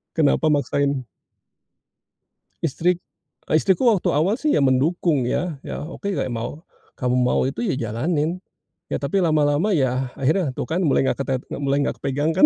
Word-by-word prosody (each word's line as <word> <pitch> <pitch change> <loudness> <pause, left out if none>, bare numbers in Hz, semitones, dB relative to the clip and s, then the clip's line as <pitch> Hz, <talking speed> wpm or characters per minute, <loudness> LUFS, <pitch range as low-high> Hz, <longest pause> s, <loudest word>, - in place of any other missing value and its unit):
Kenapa 160 0 +3
maksain 140 -2 +1 1.6
Istri 165 +3 +2 0.6
eee, - - +3
istriku 190 +4 +2
waktu 200 -5 +1
awal, 180 +9 +2
sih, 305 - +1
ya, - - +3
mendukung, 140 +1 +2
ya. 150 +2 -2
Ya, - - -5
oke, 175 +6 -5
kayak 130 - -2
mau 120 +8 -5 0.3
kamu 125 -1 0
mau 125 0 +2
itu, 135 +2 -3
ya, 185 - 0 0.2
jalanin. 155 +8 -1 0.5
Ya, - - -2
tapi 145 +8 0
lama-lama, 155 +3 +2
ya, 130 -3 0
akhirnya, 145 +1 +1
tuh, - - -2
kan, 165 +3 0
mulai 135 - +3
nggak - - 0
ketet 135 -2 -1
mulai 140 0 0
nggak - - -2
kepegang, 145 +3 0
kan. 180 - +5
145 Hz, 165 wpm, -22 LUFS, 135-170 Hz, 1.6 s, kan